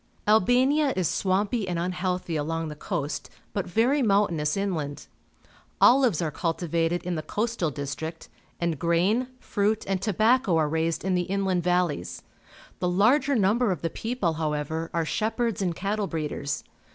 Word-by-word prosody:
Albania 255 Hz, +7 st, +4 dB
is 185 Hz, -3 st, +1 dB
swampy 200 Hz, +3 st, 0 dB
and 175 Hz, -2 st, -2 dB
unhealthy 180 Hz, 0 st, -2 dB
along 160 Hz, +1 st, -2 dB
the 150 Hz, -, -7 dB
coast, 150 Hz, -2 st, -4 dB, 0.2 s
but 200 Hz, -2 st, -2 dB
very 240 Hz, +10 st, +2 dB
mountainous 195 Hz, -, +2 dB
inland. 160 Hz, -8 st, -3 dB, 0.7 s
Olives 245 Hz, -, +5 dB
are 155 Hz, -, -1 dB
cultivated 165 Hz, +1 st, -1 dB
in 180 Hz, 0 st, -2 dB
the 155 Hz, -, -2 dB
coastal 210 Hz, +2 st, -1 dB
district, 150 Hz, +3 st, -5 dB, 0.3 s
and 170 Hz, -4 st, -1 dB
grain, 180 Hz, +10 st, +2 dB
fruit, 215 Hz, -1 st, 0 dB
and 190 Hz, -1 st, -1 dB
tobacco 215 Hz, -1 st, +3 dB
are 155 Hz, -2 st, +2 dB
raised 160 Hz, +3 st, -1 dB
in 190 Hz, -, +1 dB
the 180 Hz, 0 st, 0 dB
inland 190 Hz, -2 st, +1 dB
valleys. 175 Hz, -, -1 dB, 0.6 s
The 180 Hz, -, 0 dB
larger 255 Hz, +10 st, +3 dB
number 220 Hz, +2 st, +2 dB
of 175 Hz, -4 st, -4 dB
the 165 Hz, -, -1 dB
people, 225 Hz, -8 st, -1 dB
however, 160 Hz, +1 st, -2 dB
are 165 Hz, -1 st, 0 dB
shepherds 225 Hz, +2 st, -1 dB
and 175 Hz, -3 st, 0 dB
cattle 205 Hz, +2 st, -1 dB
breeders. 150 Hz, -4 st, -3 dB
180 Hz, 150 wpm, -26 LUFS, 165-215 Hz, 0.7 s, Olives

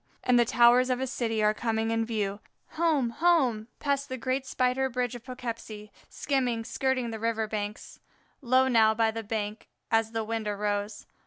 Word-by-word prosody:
and 250 Hz, -1 st, +4 dB
the 240 Hz, -, +5 dB
towers 245 Hz, +2 st, +5 dB
of 255 Hz, -1 st, 0 dB
a 265 Hz, -, -1 dB
city 230 Hz, -4 st, -1 dB
are 210 Hz, 0 st, +4 dB
coming 225 Hz, 0 st, -1 dB
in 225 Hz, 0 st, +1 dB
view! 210 Hz, -3 st, -2 dB, 0.3 s
Home! 310 Hz, -7 st, +1 dB
home! 260 Hz, -8 st, +2 dB
past 280 Hz, -1 st, -1 dB
the 260 Hz, -, -4 dB
great 260 Hz, +2 st, -2 dB
spider 255 Hz, +1 st, +1 dB
bridge 250 Hz, -1 st, -2 dB
of 240 Hz, -2 st, -8 dB
Poughkeepsie, 230 Hz, -4 st, -7 dB, 0.2 s
skimming, 250 Hz, -5 st, -1 dB
skirting 255 Hz, -2 st, -1 dB
the 220 Hz, -, -5 dB
river 225 Hz, -1 st, -1 dB
banks. 210 Hz, 0 st, -5 dB, 0.4 s
Low 260 Hz, 0 st, +3 dB
now 220 Hz, -3 st, +4 dB
by 225 Hz, 0 st, +2 dB
the 225 Hz, +1 st, -5 dB
bank 215 Hz, 0 st, -4 dB, 0.2 s
as 225 Hz, -1 st, +2 dB
the 225 Hz, -1 st, -2 dB
wind 225 Hz, 0 st, -3 dB
arose. 205 Hz, 0 st, -2 dB
230 Hz, 175 wpm, -28 LUFS, 220-255 Hz, 0.4 s, the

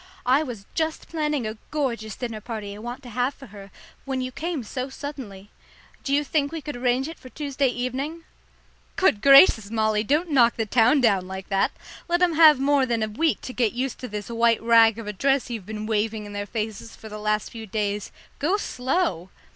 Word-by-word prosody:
I 260 Hz, +4 st, +4 dB
was 240 Hz, -9 st, -6 dB
just 320 Hz, -1 st, -2 dB
planning 300 Hz, -6 st, -1 dB
a 215 Hz, +1 st, -4 dB
gorgeous 235 Hz, -8 st, -2 dB
dinner 230 Hz, -4 st, -5 dB
party 215 Hz, -3 st, -6 dB
I -, -, -10 dB
want 240 Hz, +4 st, -7 dB
to 245 Hz, -, -10 dB
have 250 Hz, +4 st, -1 dB
for 270 Hz, -, -12 dB
her 200 Hz, -3 st, -12 dB, 0.3 s
when 265 Hz, -1 st, -3 dB
you 255 Hz, 0 st, -3 dB
came 320 Hz, 0 st, -4 dB
so 255 Hz, +4 st, -4 dB
suddenly. 255 Hz, -9 st, -8 dB, 0.5 s
Do 275 Hz, -, -3 dB
you 290 Hz, +1 st, +3 dB
think 285 Hz, -1 st, 0 dB
we 325 Hz, -, -4 dB
could 295 Hz, -, -5 dB
arrange 250 Hz, +2 st, 0 dB
it 325 Hz, -, -9 dB
for 255 Hz, -, -12 dB
Tuesday 280 Hz, -1 st, -1 dB
evening?" 265 Hz, +7 st, -3 dB, 0.7 s
"Good 225 Hz, -, +2 dB
gracious, 275 Hz, -, +7 dB
Molly, 215 Hz, -1 st, +1 dB
don't 305 Hz, +8 st, 0 dB
knock 240 Hz, -4 st, +5 dB
the 225 Hz, -, -1 dB
town 245 Hz, +6 st, +4 dB
down 195 Hz, -6 st, +2 dB
like 190 Hz, 0 st, -7 dB
that! 195 Hz, -1 st, +2 dB, 0.4 s
Let 345 Hz, +1 st, +2 dB
'em 350 Hz, -2 st, +3 dB
have 310 Hz, -2 st, +7 dB
more 275 Hz, -1 st, +3 dB
than 230 Hz, -2 st, 0 dB
a -, -, 0 dB
week 305 Hz, +10 st, 0 dB
to 255 Hz, -, -7 dB
get 235 Hz, -4 st, +1 dB
used 255 Hz, +1 st, -3 dB
to 250 Hz, -, -6 dB
this 210 Hz, -2 st, -6 dB
white 230 Hz, -1 st, +2 dB
rag 230 Hz, -1 st, +5 dB
of 230 Hz, -, -7 dB
a 210 Hz, -, -4 dB
dress 270 Hz, +4 st, +1 dB
you've 215 Hz, -5 st, -6 dB
been 215 Hz, 0 st, -5 dB
waving 215 Hz, 0 st, -1 dB
in 205 Hz, -, -9 dB
their 205 Hz, 0 st, -4 dB
faces 220 Hz, 0 st, -5 dB
for 220 Hz, -, -12 dB
the 215 Hz, 0 st, -7 dB
last 210 Hz, 0 st, -1 dB
few 225 Hz, -1 st, -8 dB
days. 205 Hz, -1 st, -2 dB, 0.3 s
Go 340 Hz, +8 st, +1 dB
slow!" 250 Hz, -, -1 dB
245 Hz, 210 wpm, -24 LUFS, 215-280 Hz, 0.7 s, gracious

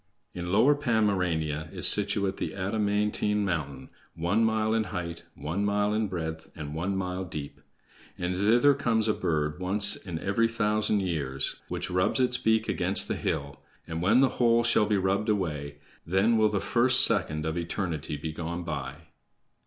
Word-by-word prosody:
"In 90 Hz, 0 st, -5 dB
Lower 115 Hz, +9 st, +5 dB
Pomerania 90 Hz, -, 0 dB
is -, -, 0 dB
situate 100 Hz, -1 st, +2 dB
the -, -, -4 dB
adamantine 105 Hz, +1 st, 0 dB
mountain, 70 Hz, -8 st, -4 dB, 0.2 s
one 90 Hz, +7 st, +1 dB
mile 110 Hz, -1 st, +1 dB
in 110 Hz, -1 st, +1 dB
height, 85 Hz, -3 st, -6 dB
one 80 Hz, +8 st, -3 dB
mile 105 Hz, 0 st, +1 dB
in 110 Hz, 0 st, 0 dB
breadth, 80 Hz, -3 st, -5 dB
and 75 Hz, -2 st, -7 dB
one 95 Hz, +5 st, -2 dB
mile 90 Hz, 0 st, -3 dB
deep; 75 Hz, -5 st, -7 dB, 0.6 s
and 90 Hz, +1 st, -2 dB
thither 115 Hz, +9 st, +4 dB
comes 115 Hz, -5 st, 0 dB
a 110 Hz, -, +3 dB
bird 75 Hz, -3 st, -1 dB
once 100 Hz, +3 st, +2 dB
in 85 Hz, -4 st, -7 dB
every 100 Hz, +6 st, +1 dB
thousand 105 Hz, -2 st, 0 dB
years 70 Hz, -8 st, -2 dB
which -, -, -4 dB
rubs 90 Hz, +7 st, +1 dB
its 125 Hz, -1 st, +1 dB
beak 110 Hz, 0 st, +1 dB
against 95 Hz, +2 st, +2 dB
the -, -, -2 dB
hill, 70 Hz, -3 st, -3 dB, 0.2 s
and, 80 Hz, 0 st, -5 dB
when 110 Hz, +8 st, +4 dB
the 135 Hz, -, +4 dB
whole 120 Hz, 0 st, +4 dB
shall 110 Hz, -2 st, +3 dB
be 105 Hz, -1 st, +2 dB
rubbed 100 Hz, +3 st, 0 dB
away, 75 Hz, -8 st, -2 dB, 0.3 s
then 95 Hz, +7 st, +2 dB
will 110 Hz, -1 st, +4 dB
the 105 Hz, -1 st, -1 dB
first 120 Hz, +6 st, +4 dB
second 75 Hz, -10 st, +2 dB
of 80 Hz, 0 st, -2 dB
eternity 85 Hz, -3 st, -3 dB
be 80 Hz, +2 st, -5 dB
gone 85 Hz, +2 st, -5 dB
by." 75 Hz, -5 st, -5 dB
95 Hz, 170 wpm, -27 LUFS, 80-110 Hz, 0.6 s, Lower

